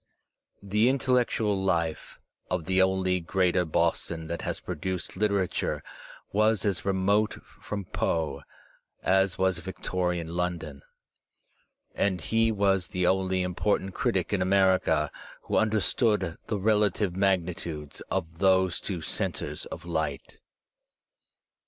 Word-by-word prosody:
The 105 Hz, +4 st, +3 dB
intellectual 120 Hz, -6 st, +1 dB
life 85 Hz, -4 st, -1 dB, 0.3 s
of 90 Hz, -3 st, -1 dB
the 95 Hz, 0 st, +3 dB
only 95 Hz, -1 st, +2 dB
Greater 90 Hz, +1 st, +1 dB
Boston 80 Hz, 0 st, 0 dB
that 85 Hz, -, -3 dB
has -, -, -3 dB
produced 90 Hz, 0 st, -4 dB
literature 100 Hz, -2 st, 0 dB, 0.5 s
was 110 Hz, 0 st, +3 dB
as 100 Hz, -3 st, 0 dB
remote 100 Hz, +2 st, +1 dB, 0.2 s
from 100 Hz, -2 st, -5 dB
Foe 80 Hz, -2 st, -1 dB, 0.6 s
as 95 Hz, 0 st, +3 dB
was 95 Hz, -2 st, +1 dB
Victorian 90 Hz, -2 st, -2 dB
London, 85 Hz, -5 st, -3 dB, 1.1 s
and 95 Hz, -2 st, 0 dB
he 115 Hz, +6 st, +2 dB
was 100 Hz, -4 st, +2 dB
the 90 Hz, 0 st, -1 dB
only 95 Hz, 0 st, +2 dB
important 95 Hz, +1 st, 0 dB
critic -, -, 0 dB
in 100 Hz, -, +1 dB
America 95 Hz, -5 st, +3 dB, 0.3 s
who -, -, -2 dB
understood 105 Hz, -3 st, +2 dB
the 105 Hz, -, -1 dB
relative 105 Hz, -2 st, +2 dB
magnitudes 85 Hz, -6 st, -1 dB
of 85 Hz, -3 st, -3 dB
those 95 Hz, -2 st, +3 dB
two 90 Hz, -5 st, -4 dB
centres -, -, -3 dB
of -, -, -8 dB
light. 80 Hz, -4 st, -3 dB
95 Hz, 115 wpm, -28 LUFS, 85-100 Hz, 1.1 s, The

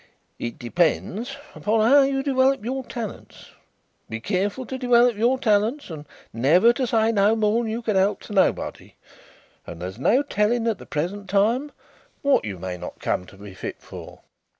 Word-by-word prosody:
"It 120 Hz, -, -5 dB
depends 175 Hz, -, -1 dB, 0.2 s
upon 215 Hz, +1 st, +1 dB
how 280 Hz, +3 st, +7 dB
you 270 Hz, 0 st, +1 dB
dewelop 270 Hz, -3 st, +2 dB
your 265 Hz, +2 st, -3 dB
talents. 235 Hz, -4 st, -8 dB, 0.6 s
Be 115 Hz, -, -4 dB
careful 200 Hz, -, -2 dB
to 260 Hz, +2 st, -6 dB
dewelop 245 Hz, -2 st, +4 dB
your 240 Hz, +5 st, +2 dB
talents, 225 Hz, -, 0 dB
and 150 Hz, -2 st, -8 dB, 0.3 s
never 165 Hz, -, +4 dB
to 255 Hz, 0 st, -1 dB
say 225 Hz, -1 st, +2 dB
no 210 Hz, 0 st, +3 dB
more 220 Hz, +1 st, +2 dB
than 225 Hz, -2 st, -3 dB
you 235 Hz, +2 st, -4 dB
can 215 Hz, -3 st, -1 dB
help 190 Hz, +2 st, +2 dB
to -, -, -9 dB
nobody, 195 Hz, -, 0 dB, 0.7 s
and 85 Hz, -, -8 dB
there's 95 Hz, +5 st, -7 dB
no 245 Hz, -, +3 dB
telling 230 Hz, -2 st, 0 dB
at 220 Hz, -4 st, -1 dB
the -, -, -12 dB
present 185 Hz, +6 st, -4 dB
time 230 Hz, +9 st, +1 dB, 0.5 s
what 280 Hz, -, +3 dB
you 100 Hz, -3 st, -5 dB
may 90 Hz, 0 st, -5 dB
not -, -, -8 dB
come 90 Hz, -, -2 dB
to 105 Hz, -, -15 dB
be 100 Hz, -1 st, -11 dB
fit -, -, -7 dB
for." -, -, -11 dB
215 Hz, 175 wpm, -23 LUFS, 175-245 Hz, 0.7 s, how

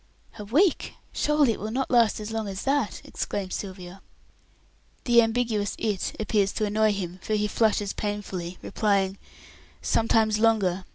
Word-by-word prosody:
"A -, -, -5 dB
week! 315 Hz, -, +2 dB, 0.2 s
Surely 300 Hz, -4 st, +3 dB
it 220 Hz, -, -4 dB
will 215 Hz, -, -4 dB
not 260 Hz, +4 st, -2 dB
last 235 Hz, -3 st, +4 dB
so 215 Hz, -, -6 dB
long 220 Hz, -2 st, -2 dB
as 195 Hz, 0 st, -5 dB
that!" 275 Hz, -5 st, 0 dB
exclaims 195 Hz, -3 st, -4 dB
Sylvia. 185 Hz, -1 st, -7 dB, 1.0 s
The 240 Hz, -2 st, +6 dB
ambiguous 225 Hz, -3 st, 0 dB
"it" 210 Hz, -4 st, -2 dB
appears 210 Hz, -2 st, +1 dB
to 215 Hz, -, 0 dB
annoy 215 Hz, +1 st, +2 dB
him, 185 Hz, -2 st, -5 dB
for 215 Hz, -, -1 dB
he 210 Hz, 0 st, +1 dB
flushes 210 Hz, -2 st, +1 dB
painfully, 195 Hz, -4 st, -4 dB
replying, 200 Hz, -3 st, 0 dB, 0.6 s
"Sometimes 220 Hz, -1 st, +2 dB
longer. 195 Hz, -5 st, +2 dB
210 Hz, 150 wpm, -26 LUFS, 195-225 Hz, 1.0 s, The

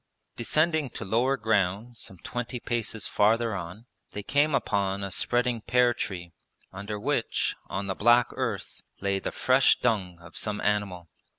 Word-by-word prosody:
Descending 155 Hz, +3 st, +1 dB
to 115 Hz, -, -7 dB
lower 125 Hz, +7 st, +2 dB
ground 110 Hz, +1 st, 0 dB
some 95 Hz, -4 st, -8 dB
twenty 125 Hz, 0 st, -4 dB
paces 115 Hz, -2 st, -2 dB
farther 115 Hz, +2 st, +2 dB
on 95 Hz, +5 st, -7 dB, 0.3 s
they 105 Hz, -, -5 dB
came 145 Hz, +4 st, +2 dB
upon 100 Hz, -5 st, 0 dB
a 100 Hz, -, -4 dB
spreading 120 Hz, +1 st, +1 dB
pear 125 Hz, +1 st, +3 dB
tree, 90 Hz, -6 st, -5 dB, 0.4 s
under 100 Hz, +2 st, -5 dB
which, -, -, 0 dB
on 100 Hz, +1 st, -3 dB
the 95 Hz, -, -1 dB
black 120 Hz, +4 st, +4 dB
earth, 120 Hz, -6 st, -4 dB, 0.2 s
lay 100 Hz, 0 st, 0 dB
the -, -, -4 dB
fresh 130 Hz, +1 st, +4 dB
dung 95 Hz, -7 st, 0 dB
of 85 Hz, 0 st, -14 dB
some 105 Hz, -1 st, -2 dB
animal. 100 Hz, -4 st, -1 dB
110 Hz, 155 wpm, -27 LUFS, 100-120 Hz, 0.4 s, black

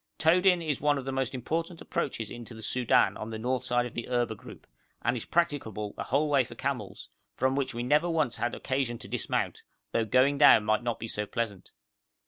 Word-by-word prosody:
Todin 180 Hz, +2 st, +4 dB
is 145 Hz, -3 st, -1 dB
one 145 Hz, 0 st, +3 dB
of 135 Hz, -, -5 dB
the 135 Hz, -, -2 dB
most 135 Hz, -1 st, -1 dB
important 165 Hz, +6 st, -3 dB
approaches 115 Hz, -5 st, -3 dB
into 120 Hz, -1 st, -8 dB
the 110 Hz, -, -9 dB
Soudan 125 Hz, +2 st, +3 dB
on 110 Hz, -, -6 dB
the 110 Hz, -, -5 dB
north 125 Hz, +2 st, -1 dB
side 120 Hz, -1 st, +1 dB
of 125 Hz, -, -7 dB
the 120 Hz, -, -5 dB
Erba 120 Hz, -2 st, +1 dB
group, 105 Hz, -, -13 dB, 0.4 s
and 120 Hz, -, +1 dB
is 115 Hz, -, -4 dB
practicable 120 Hz, -, -1 dB
the -, -, -5 dB
whole 145 Hz, +4 st, +1 dB
way 140 Hz, -3 st, +4 dB
for 120 Hz, -, -11 dB
camels, 140 Hz, -1 st, -4 dB, 0.3 s
from 130 Hz, +1 st, +1 dB
which 135 Hz, -3 st, -1 dB
we 120 Hz, -, -2 dB
never 150 Hz, +7 st, +3 dB
once 155 Hz, -8 st, 0 dB
had 120 Hz, 0 st, -1 dB
occasion 130 Hz, -3 st, -1 dB
to -, -, -9 dB
dismount, -, -, -2 dB, 0.3 s
though 115 Hz, -, +1 dB
going 130 Hz, +5 st, +3 dB
down 140 Hz, -7 st, +7 dB
might 110 Hz, +2 st, +2 dB
not 120 Hz, -1 st, -2 dB
be 115 Hz, -, -5 dB
so 105 Hz, -1 st, -3 dB
pleasant. 105 Hz, -4 st, -4 dB
125 Hz, 215 wpm, -29 LUFS, 115-145 Hz, 0.4 s, down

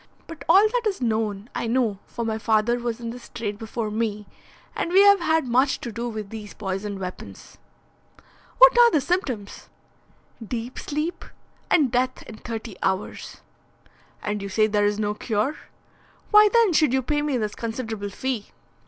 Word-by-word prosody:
But 330 Hz, -1 st, -10 dB
all 390 Hz, +5 st, +7 dB
that 475 Hz, 0 st, -1 dB
is 400 Hz, -, -2 dB
known 220 Hz, -3 st, -1 dB
I -, -, -2 dB
know, 225 Hz, -4 st, 0 dB
for 235 Hz, -, -5 dB
my 220 Hz, -1 st, -2 dB
father 220 Hz, +2 st, +2 dB
was 235 Hz, -1 st, -3 dB
in 230 Hz, -1 st, -5 dB
this 245 Hz, 0 st, -11 dB
trade 215 Hz, -4 st, -5 dB
before 225 Hz, -1 st, -4 dB
me, 210 Hz, -1 st, -2 dB, 0.5 s
and 340 Hz, -, -2 dB
we 385 Hz, +2 st, +7 dB
have 405 Hz, -1 st, +7 dB
had 320 Hz, -4 st, +1 dB
much 260 Hz, +3 st, +2 dB
to 235 Hz, -, -5 dB
do 235 Hz, +2 st, -4 dB
with 215 Hz, -3 st, -6 dB
these 215 Hz, -2 st, -8 dB
poisoned 195 Hz, 0 st, -4 dB
weapons." 185 Hz, -1 st, -9 dB, 1.0 s
"What -, -, +8 dB
are 475 Hz, 0 st, +8 dB
the 315 Hz, -, +2 dB
symptoms?" 260 Hz, -, -3 dB, 0.7 s
"Deep 235 Hz, +2 st, -5 dB
sleep, 300 Hz, +4 st, -3 dB, 0.5 s
and 290 Hz, -8 st, +3 dB
death 255 Hz, +1 st, 0 dB
in 220 Hz, -, -11 dB
thirty 225 Hz, -4 st, -7 dB
hours." 190 Hz, +1 st, -3 dB, 0.8 s
"And 210 Hz, 0 st, -2 dB
you 200 Hz, -, -5 dB
say 215 Hz, +2 st, +3 dB
there 205 Hz, -1 st, +2 dB
is 205 Hz, 0 st, -1 dB
no 210 Hz, -1 st, -1 dB
cure. 220 Hz, +6 st, -1 dB, 0.8 s
Why 420 Hz, 0 st, +8 dB
then 460 Hz, -6 st, +4 dB
should 305 Hz, -5 st, +3 dB
you 265 Hz, 0 st, +1 dB
pay 295 Hz, +3 st, 0 dB
me 295 Hz, -3 st, 0 dB
this 215 Hz, -3 st, -2 dB
considerable 225 Hz, -3 st, -4 dB
fee?" 240 Hz, +1 st, -4 dB
230 Hz, 170 wpm, -24 LUFS, 210-290 Hz, 1.0 s, What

